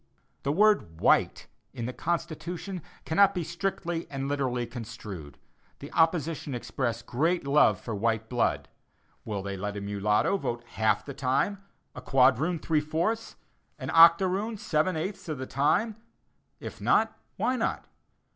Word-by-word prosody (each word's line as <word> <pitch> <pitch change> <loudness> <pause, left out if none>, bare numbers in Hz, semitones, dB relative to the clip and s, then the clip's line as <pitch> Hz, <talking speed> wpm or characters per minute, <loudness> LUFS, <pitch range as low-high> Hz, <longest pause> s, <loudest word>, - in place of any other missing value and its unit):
The 140 - 0
word 195 - +3
"white" - - +3 0.3
in 120 -3 -4
the 125 - -4
Constitution 175 +3 -3 0.2
cannot 200 +4 +4
be 175 - -1
strictly 175 0 -3
and 135 -1 -4
literally 130 -4 -1
construed. 105 - -8 0.4
The 140 - -10
opposition 160 -4 +1
express 120 -1 -3
great 160 +8 0
love 145 +2 +4
for 115 - -5
white 110 +1 0
blood. 120 0 0 0.6
Will 100 -3 -3
they 100 0 -4
let 105 +2 -4
a - - -4
mulatto 105 - +1
vote 120 -9 -3
half 110 0 +1
the 140 - -6
time, 140 +11 0 0.3
a 130 - -8
quadroon 135 +6 +3
three 155 -1 +1
fourths, 170 +10 -2 0.4
and - - -5
an - - -3
octoroon 185 +6 +5
seven 160 -1 0
eighths 190 +2 -4
of 155 - -2
the 130 - -5
time? 205 - +1 0.6
If - - -8
not, - - +3 0.2
why 255 - +1
not? 230 - -2
150 Hz, 145 wpm, -28 LUFS, 120-175 Hz, 0.6 s, octoroon